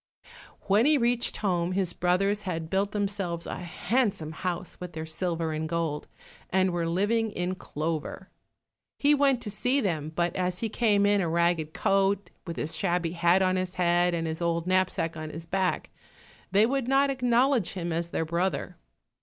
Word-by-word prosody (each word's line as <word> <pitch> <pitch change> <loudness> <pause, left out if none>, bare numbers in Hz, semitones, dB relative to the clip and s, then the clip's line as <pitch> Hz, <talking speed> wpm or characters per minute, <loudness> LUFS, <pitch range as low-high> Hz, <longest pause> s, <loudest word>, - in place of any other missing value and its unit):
When 210 +6 +3
he 305 -1 +5
reached 240 -1 +1
home, 180 -3 0
his 185 -2 0
brothers 195 +4 +1
had 165 -4 -4
built 195 +1 +1
themselves 195 -5 -2
a - - -4
handsome 180 -1 -1
house 180 +2 -4
with 180 -2 -7
their 160 0 -5
silver 165 0 -2
and 155 0 -3
gold, 165 -3 -2 0.4
and 190 0 +2
were 170 -1 -1
living 210 +6 +1
in 180 -2 -2
clover. 165 +2 -4 0.7
He 290 +1 +4
went 275 -4 +3
to 210 - -4
see 250 +6 +1
them, 160 - -1
but 170 0 0
as 180 -1 -1
he 225 +3 -2
came 210 -3 +2
in 205 0 +3
a 170 - 0
ragged 170 -2 +1
coat, 195 0 +1 0.2
with 170 - -4
his 160 +2 -3
shabby 175 -1 0
hat 175 +2 +3
on 185 0 +2
his 185 0 -3
head, 175 0 +2
and 165 -1 -2
his 160 +1 -4
old 170 0 0
knapsack 185 -3 +1
on 155 -1 -6
his 160 +2 -8
back, 190 +2 -1 0.6
they 205 +2 +5
would 265 0 -1
not 275 +1 +3
acknowledge 250 -4 +2
him 175 -3 -3
as 170 +1 -2
their 165 - -1
brother. 170 +4 -2
180 Hz, 180 wpm, -27 LUFS, 170-205 Hz, 0.7 s, he